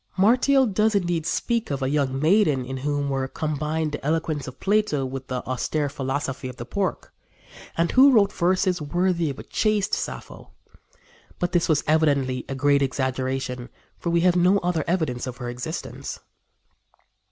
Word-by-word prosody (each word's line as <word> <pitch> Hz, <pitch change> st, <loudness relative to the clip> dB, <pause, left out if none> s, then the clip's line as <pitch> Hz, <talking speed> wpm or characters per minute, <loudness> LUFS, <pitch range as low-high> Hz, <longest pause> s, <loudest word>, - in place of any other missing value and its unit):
Martial 255 Hz, +7 st, +4 dB
does 215 Hz, 0 st, +1 dB
indeed 175 Hz, -4 st, 0 dB
speak 230 Hz, +5 st, -1 dB
of 140 Hz, -2 st, -2 dB
a -, -, +1 dB
young 135 Hz, -3 st, 0 dB
maiden 155 Hz, -5 st, +3 dB
in 130 Hz, +1 st, -5 dB
whom 145 Hz, +1 st, -1 dB
were 135 Hz, -1 st, -1 dB
combined 155 Hz, +2 st, -2 dB
the 145 Hz, -, -6 dB
eloquence 155 Hz, -1 st, -1 dB
of 130 Hz, -, -9 dB
Plato 200 Hz, -9 st, +1 dB
with 130 Hz, 0 st, -6 dB
the 125 Hz, -1 st, -4 dB
austere 145 Hz, +3 st, -1 dB
philosophy 135 Hz, -1 st, -3 dB
of 125 Hz, -, -9 dB
the 120 Hz, -, -7 dB
Porch, 190 Hz, +8 st, -2 dB, 0.7 s
and 165 Hz, 0 st, +2 dB
who 270 Hz, +2 st, +7 dB
wrote 210 Hz, -5 st, +4 dB
verses 180 Hz, 0 st, +1 dB
worthy 175 Hz, +1 st, 0 dB
of 135 Hz, -, -5 dB
a -, -, -8 dB
chaste 215 Hz, -2 st, 0 dB
Sappho; -, -, -5 dB, 0.8 s
but 175 Hz, 0 st, -1 dB
this 175 Hz, -2 st, +1 dB
was 150 Hz, -2 st, +3 dB
evidently 140 Hz, -5 st, +1 dB
a 135 Hz, -, -3 dB
great 140 Hz, +1 st, +3 dB
exaggeration, 130 Hz, -1 st, -2 dB, 0.3 s
for 170 Hz, -, -2 dB
we 170 Hz, 0 st, +2 dB
have 180 Hz, 0 st, +4 dB
no 180 Hz, +3 st, +4 dB
other 175 Hz, -3 st, 0 dB
evidence 155 Hz, -9 st, -1 dB
of 125 Hz, -1 st, -6 dB
her 120 Hz, -1 st, -5 dB
existence. 125 Hz, +8 st, -6 dB
150 Hz, 165 wpm, -24 LUFS, 135-180 Hz, 0.8 s, who